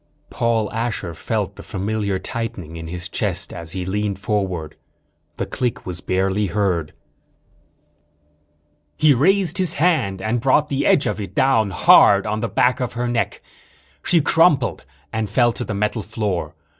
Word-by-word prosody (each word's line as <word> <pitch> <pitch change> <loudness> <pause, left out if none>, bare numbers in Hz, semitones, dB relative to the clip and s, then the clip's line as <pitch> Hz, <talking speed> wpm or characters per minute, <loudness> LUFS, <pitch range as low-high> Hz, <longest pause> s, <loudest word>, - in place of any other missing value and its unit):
Paul 115 -4 0
Asher 115 -6 -3
felt - - -3
the - - -8
familiar 100 0 -2
tightening 95 -6 -5
in 80 0 -7
his 90 +1 -4
chest 95 0 -2
as 85 -2 -6
he 95 -1 -4
leaned 100 +1 -2
forward. 95 -6 -2 0.6
The - - -2
click 125 -3 -3
was 90 -2 -5
barely 95 +2 0
heard. 90 -5 -1 2.0
He 155 -2 +5
raised 185 +6 +2
his 180 -3 0
hand 155 - +1
and 110 +5 -1
brought 140 +4 +3
the 140 0 0
edge 145 - +4
of - - -2
it 100 - -8
down 115 -6 +3
hard 100 +1 +6
on 110 0 -2
the - - -2
back 125 +1 +2
of 125 -2 -3
her 120 +1 -2
neck. 120 -1 -2 0.6
She 170 -2 +3
crumpled 150 -4 +2 0.3
and 110 -1 -2
fell 120 +3 +3
to 100 - -5
the 105 - -4
metal 105 +2 -1
floor. 100 -8 -3
105 Hz, 155 wpm, -21 LUFS, 95-125 Hz, 2.0 s, hard